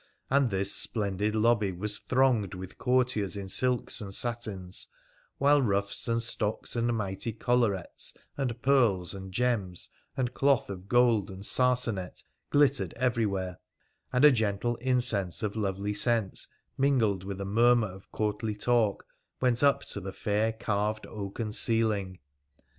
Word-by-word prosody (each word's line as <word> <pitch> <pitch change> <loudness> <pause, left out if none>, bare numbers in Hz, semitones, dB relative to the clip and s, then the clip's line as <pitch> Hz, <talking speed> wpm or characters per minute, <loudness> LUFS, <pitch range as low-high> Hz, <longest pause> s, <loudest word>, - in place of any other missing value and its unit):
And 135 -2 +3
this 95 0 0
splendid 105 -1 +2
lobby 110 -2 +2
was 105 +4 -4
thronged 125 -8 +1
with 95 0 -9
courtiers 125 -6 +1
in 100 -1 -5
silks 125 +4 +1
and 100 -2 -6
satins, 105 -5 -2 0.5
while 145 +1 +4
ruffs 100 -3 -1
and 115 0 0
stocks 110 -1 -1
and 120 0 +1
mighty 100 +2 -3
collarets, 110 -4 -1 0.2
and 125 -4 -3
pearls 115 -11 +3
and 95 -1 -8
gems, 100 -5 -1 0.3
and 125 -2 -1
cloth 135 -6 +2
of 95 0 -8
gold 120 -4 +3
and 95 +1 -8
sarsanet 125 -8 +1 0.3
glittered 145 -1 +2
everywhere, 100 -7 -1 0.5
and 125 +3 +4
a 150 - +9
gentle 110 0 0
incense 120 -8 0
of 105 0 -2
lovely 100 -1 -2
scents 110 -1 0 0.3
mingled 115 -9 +2
with 100 0 -6
a 100 - -3
murmur 115 +3 +4
of 95 -1 -11
courtly 105 0 -2
talk 110 -1 +1 0.3
went 125 -2 +1
up 140 -1 +4
to - - -5
the 95 0 -6
fair 105 +3 0
carved 110 -1 -2
oaken 105 +1 -5
ceiling. 105 -5 +1
110 Hz, 140 wpm, -29 LUFS, 100-120 Hz, 0.5 s, a